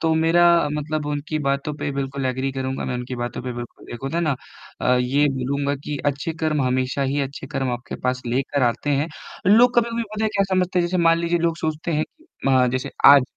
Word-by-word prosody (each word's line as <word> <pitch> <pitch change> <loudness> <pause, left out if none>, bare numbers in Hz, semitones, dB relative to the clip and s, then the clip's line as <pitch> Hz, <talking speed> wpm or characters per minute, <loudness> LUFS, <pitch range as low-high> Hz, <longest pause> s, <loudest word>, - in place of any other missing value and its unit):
तो 160 -1 +2
मेरा 165 +2 +4 0.3
मतलब 150 0 -2
उनकी 150 +1 -2
बातों 140 +2 0
पे 145 - -3
बिल्कुल 135 0 -2
एग्री 130 +1 -1
करूँगा 130 0 -3
मैं - - -2
उनकी 125 +1 -4
बातों 120 0 -4
पे 125 - -4
बिल्कुल 120 0 -9
एक 120 - -8
होता 135 +5 -3
है 170 - +1
ना 155 -4 +1 0.5
अ, 125 - +3
ये 130 +4 +2
बोलूँगा 140 +2 -1
कि 150 - -3
अच्छे 145 +3 -1
कर्म 150 -3 +1
हमेशा 130 +2 0
ही 140 +2 0
अच्छे 140 0 -5
कर्म 135 -3 -2
आपके 120 0 -5
पास 125 0 0
लेकर 135 +3 0
आते 120 +4 +1
हैं। 145 +3 +1 0.4
लोग 240 +5 +6
कभी-कभी 235 0 +2
पता 215 +1 -1
है 220 - +3
क्या 200 - +4
समझते 185 0 +1
हैं 175 - +2
जैसे 180 +2 -1
मान 165 0 +5
लीजिए 170 +1 +1
लोग 165 0 0
सोचते 160 +1 -2
हैं 155 +1 +1
कि 320 - -23 0.2
अ, 130 -1 +5
जैसे 130 0 -2
आज, 140 -1 +9
140 Hz, 225 wpm, -22 LUFS, 130-165 Hz, 0.5 s, आज